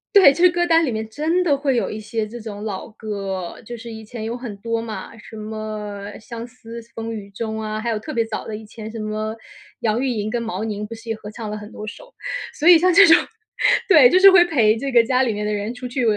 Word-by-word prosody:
对， 365 -9 +9
就 340 +5 -1
是 360 - +8
歌 350 0 +1
单 330 -1 +4
里 260 - 0
面 220 0 -3
真 320 +9 0
的 295 -5 +3
会 275 -2 0
有 235 - 0
一 215 - -5
些 215 0 -3
这 240 +2 -8
种 210 -2 -7
老 205 0 -5
歌， 195 -4 -5
就 240 +2 -7
是 230 0 -9
以 220 0 -9
前 220 0 -8
有 230 +2 -3
很 240 -5 -7
多 230 +2 -2
嘛， 220 -1 -7
什 220 - -12
么 215 -2 -6
《相 230 +1 -7
思 235 -1 -10
风 225 0 -4
雨 200 -2 -7
中》 220 +2 -4
啊， 215 0 -3
还 235 +1 -2
有 215 - -1
特 310 - -7
别 230 -4 0
早 225 -1 -5
的 215 - -4
以 220 - -11
前 220 0 -9
什 230 - -8
么 215 0 -3 0.5
杨 225 +2 +1
玉 270 - 0
莹 215 -3 -2
跟 240 - -1
毛 220 -2 -4
宁 210 -1 -4
不 230 - -7
是 230 +1 -11
也 225 - 0
合 210 -1 -10
唱 220 0 -7
了 - - -3
很 210 +1 -10
多 215 - -8
首。 - - -10 0.4
所 315 - 0
以 345 -2 +9
像 365 +1 +4
这 400 +3 +8
种， 325 - +8 0.7
对， 300 -10 +8
就 365 - +4
是 390 0 +9
会 360 -2 +8
陪 230 -10 +3
这 275 +2 -3
个 235 -1 +6
家 255 +2 +2
里 245 -4 +2
面 210 0 -3
的 210 - -1
人 210 +3 -3
出 250 0 -6
去， 250 +1 -2
225 Hz, 285 characters per minute, -21 LUFS, 215-255 Hz, 0.7 s, 对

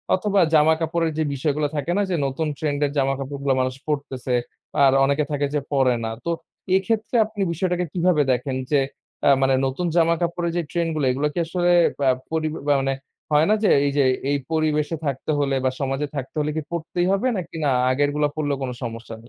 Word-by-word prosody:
অথবা 200 +1 +1
জামাকাপড়ের 160 +2 +3
যে 160 - +2
বিষয়গুলো 145 +2 0
থাকে 145 +4 -2
না - - +3
যে, 180 - +1
নতুন 145 +4 -2
ট্রেন্ড 145 -2 -1
এর 140 - -2
জামাকাপড়গুলো 135 0 0
মানুষ 130 0 -1
পড়তেছে, 135 -4 -2 0.5
আর 135 - +6
অনেকে 140 +2 +2
থাকে 145 0 0
যে - - +3
পড়ে 130 -3 +3
না। 110 - -2
তো 170 - 0 0.5
এক্ষেত্রে 215 +4 -2
আপনি 215 -2 -6
বিষয়টাকে 180 +1 -1
কিভাবে 175 -3 +2
দেখেন 130 +2 -1 0.2
যে, 145 - +4 0.5
আ - - +7
মানে 135 0 +3
নতুন 135 +7 -2
জামাকাপড়ের 170 +1 +1
যে - - +2
ট্রেন্ডগুলা, 165 -4 0
এগুলা 145 +4 0
কি - - -2
আসলে 175 +1 0 0.4
আ - - +6 0.2
পরি 160 -1 -1 0.2
বা 145 - +5
মানে 135 0 0 0.4
হয় 150 +2 +5
না - - +5
যে, - - +4 0.2
এই 140 - +1
যে 140 - +5 0.3
এই 145 - +2
পরিবেশে 155 0 +1
থাকতে 140 +2 -2
হলে 140 -1 +1
বা 130 - +3
সমাজে 135 +1 -1
থাকতে 135 +3 -5
হলে 150 0 0
কি, 155 - -1
পড়তেই 170 +1 -2
হবে 195 +6 +1
নাকি 170 -2 -6
না, - - +3 0.2
আগেরগুলা 145 +2 +1
পড়লেও 145 -3 -1
কোন 125 - -2
সমস্যা 115 0 -6
নেই? - - -5
150 Hz, 195 wpm, -23 LUFS, 135-170 Hz, 0.5 s, আ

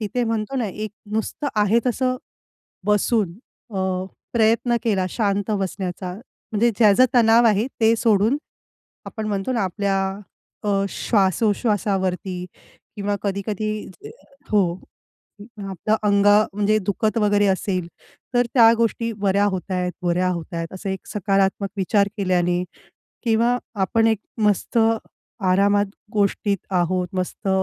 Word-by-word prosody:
तिथे 235 +3 -1
म्हणतो 225 +3 -2
ना 235 -4 0
एक 210 +2 -5 0.2
नुसतं 220 +6 -2
आहे 210 +2 +4
तसं 255 +1 0 0.7
बसून 210 -2 +2 0.4
अ, - - 0 0.5
प्रयत्न 230 +1 +2
केला 195 -5 +1
शांत 205 -2 -1
बसण्याचा 190 -2 -3 0.4
म्हणजे 230 +3 +3
ज्याचा 215 +2 +6
तणाव 230 0 +5
आहे 215 +2 +3
ते 225 +1 +5
सोडून. 220 +3 +3 0.7
आपण 220 -2 -5
म्हणतो 200 +4 -2
ना 230 - 0
आपल्या 195 +1 -1 0.7
अ, 200 -1 +1
श्वासोश्वासावरती 195 -3 0 0.5
किंवा 205 0 -1
कधी-कधी 205 +1 -2 0.8
हो. 200 -4 +4 1.0
आपलं 195 +4 0
अंग 200 -1 +3 0.3
म्हणजे 210 +1 +2
दुखत 215 +3 0
वगैरे 205 -1 +3
असेल 190 -2 -1 0.5
तर 245 0 +3
त्या 230 -3 +7
गोष्टी 230 0 0
बऱ्या 200 0 +2
होत 190 -1 -2
आहेत, 180 -1 -1
बऱ्या 180 +1 +1
होत 175 0 -4
आहेत. 165 0 -3
असं 190 +1 -5
एक 190 -1 -5
सकारात्मक 195 0 0
विचार 200 +1 +2
केल्याने 180 -2 +1 0.6
किंवा 235 +2 +3 0.3
आपण 225 +4 +2
एक 220 -2 +2 0.2
मस्त 210 +3 +1 0.7
आरामात 200 +2 +3 0.3
गोष्टीत 205 -1 +1
आहोत 180 0 0
मस्त 185 +2 -3
205 Hz, 120 wpm, -22 LUFS, 190-220 Hz, 1.0 s, त्या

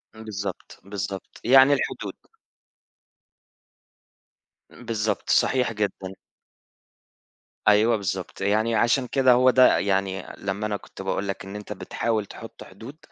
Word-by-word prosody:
إمم، 110 - -11
بالضبط، 100 -2 -6
بالضبط 100 0 -6
يعني 135 +3 +6
الحدود. 140 - -3 2.6
بالضبط، 110 -3 -3
صحيح 125 -2 +2
جدًا. 100 -3 -3 1.5
أيوه 110 +2 +5
بالضبط، 95 -2 -5
يعني 110 +3 +1
عشان 120 +4 +2
كده 130 0 +3
هو 125 +1 +5
ده 130 0 +5
يعني 95 -1 -1
لمّا 100 +2 -3
أنا 105 -1 -2
كنت - - -12
باقول 95 +1 -2
لك 95 - -5
إن 95 +1 -8
أنت 105 0 -6
بتحاول 110 +2 -2
تحُط - - -11
حدود، 115 +10 -12
105 Hz, 120 wpm, -24 LUFS, 100-120 Hz, 2.6 s, يعني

